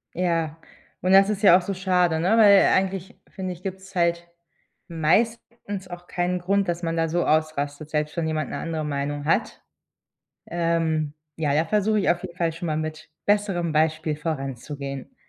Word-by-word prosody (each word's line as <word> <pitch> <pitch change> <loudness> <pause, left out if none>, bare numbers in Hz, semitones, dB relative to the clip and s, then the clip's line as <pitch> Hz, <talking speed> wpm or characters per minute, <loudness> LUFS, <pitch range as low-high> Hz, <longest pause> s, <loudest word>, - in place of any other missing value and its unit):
Ja. 165 -3 0 0.4
Und 185 - +1
das 195 +1 +7
ist 210 -1 -2
ja 180 -3 +8
auch - - -2
so 195 +3 -3
schade, 180 -3 +1
ne? 175 +3 +1
Weil 200 -3 +7
eigentlich 190 -1 -1
finde 185 -2 -5
ich, 175 +1 -15
gibt's 190 0 -7
halt 170 -1 +1 0.6
meistens 200 +4 -1
auch 175 0 -10
keinen 180 +1 -1
Grund, 195 +2 +1
dass 175 0 -2
man 165 0 -1
da 165 0 +1
so 175 +2 0
ausrastet, 155 -1 -1
selbst 150 +1 -2
wenn 165 -1 0
jemand 155 -1 -2
'ne - - -4
andere 160 -2 -3
Meinung 145 0 -3
hat. 160 - 0 0.8
Ähm 165 -3 0 0.2
ja, 150 -3 0
da 155 +3 +2
versuche 210 +4 +1
ich 195 - +1
auf 175 0 +2
jeden 175 -2 -7
Fall 165 -2 0
schon 170 +1 -5
mal 155 -1 -1
mit 155 0 -5 0.2
besserem 195 -5 +1
Beispiel 155 0 +1
voranzugehen. 140 - -5
170 Hz, 175 wpm, -24 LUFS, 155-185 Hz, 0.8 s, ja